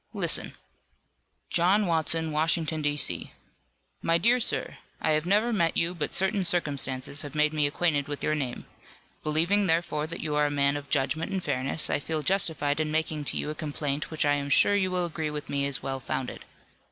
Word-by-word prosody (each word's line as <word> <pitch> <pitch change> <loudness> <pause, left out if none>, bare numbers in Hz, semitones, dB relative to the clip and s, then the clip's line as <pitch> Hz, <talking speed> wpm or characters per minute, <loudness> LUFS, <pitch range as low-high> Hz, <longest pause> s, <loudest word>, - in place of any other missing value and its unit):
Listen." - - -2 1.0
"John 190 +5 +3
Watson, 160 -1 +1
Washington, 160 0 +1
D. 145 0 0
C. - - 0 0.7
"My 165 0 +2
dear 235 +9 +3
sir: 240 - 0 0.2
I 155 - +1
have 155 +2 +1
never 215 +5 +2
met 170 -6 +1
you, 170 +2 +1
but 170 -4 -3
certain 190 +2 +1
circumstances 145 -5 0
have 145 -1 -7
made 150 0 +2
me 150 -2 +2
acquainted 145 -1 0
with 145 -1 -5
your 155 - +1
name. 135 -5 -3 0.6
Believing 170 +7 +1
therefore 160 -2 0
that 165 - -5
you 155 -1 -3
are 150 0 +3
a - - -1
man 140 0 +2
of 145 -1 -6
judgment 155 +6 0
and 190 -2 -2
fairness 135 +4 0
I - - 0
feel 155 +1 -2
justified 160 -6 +2
in 155 -1 0
making 155 -1 -1
to - - -2
you 150 - -2
a - - -3
complaint 145 -1 -3
which 155 -2 0
I 145 - +3
am 140 0 -2
sure 205 +7 +5
you 190 -2 +1
will 180 -1 0
agree 160 -2 -3
with 150 -1 -6
me 140 0 0
is 140 -2 -2
well 135 0 -3
founded. 130 0 -4
155 Hz, 200 wpm, -27 LUFS, 145-170 Hz, 1.0 s, sure